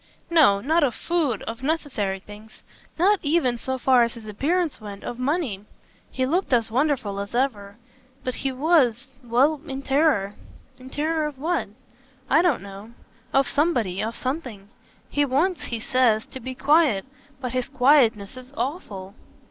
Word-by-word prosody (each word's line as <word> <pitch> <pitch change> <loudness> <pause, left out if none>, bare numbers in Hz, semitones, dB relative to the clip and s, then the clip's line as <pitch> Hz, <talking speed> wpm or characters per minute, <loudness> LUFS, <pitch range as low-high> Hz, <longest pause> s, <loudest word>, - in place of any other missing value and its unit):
"No, 265 -12 +5
not 320 +6 +2
of 255 -5 +1
food, 310 - -1
of 230 +2 -6
necessary 265 -10 -1
things 210 +2 -14 0.3
not 390 +4 +4
even, 285 -6 +1
so 260 +2 -3
far 255 -1 +4
as 235 0 +1
his 230 -2 -11
appearance 300 - -1
went, 205 -1 -9
of 240 - -6
money. 255 - -1 0.5
He 260 - -1
looked 345 +7 0
as 230 -2 +2
wonderful 250 -6 0
as 200 +3 -5
ever. 210 -6 -1 0.5
But 255 - -2
he 270 +1 -2
was 265 -3 +2
well, 265 +6 +2
in 270 -1 -5
terror." 270 -9 +2 0.5
"In 255 +1 -11
terror 310 +2 -1
of 295 -3 -8
what?" 330 +5 -1 0.6
"I 310 - +6
don't 335 - +1
know. 200 +3 -10 0.4
Of 270 -1 +3
somebody 245 - 0
of 225 +2 -3
something. 255 -8 -4 0.4
He 290 - +1
wants, 300 +7 0
he 235 - -4
says, 225 -2 +2
to 260 - -7
be 260 +1 -6
quiet. 280 -7 +3 0.3
But 250 -2 -4
his 255 0 -1
quietness 250 -6 +3
is 255 +1 -11
awful." 220 - -4
255 Hz, 160 wpm, -24 LUFS, 220-295 Hz, 0.6 s, I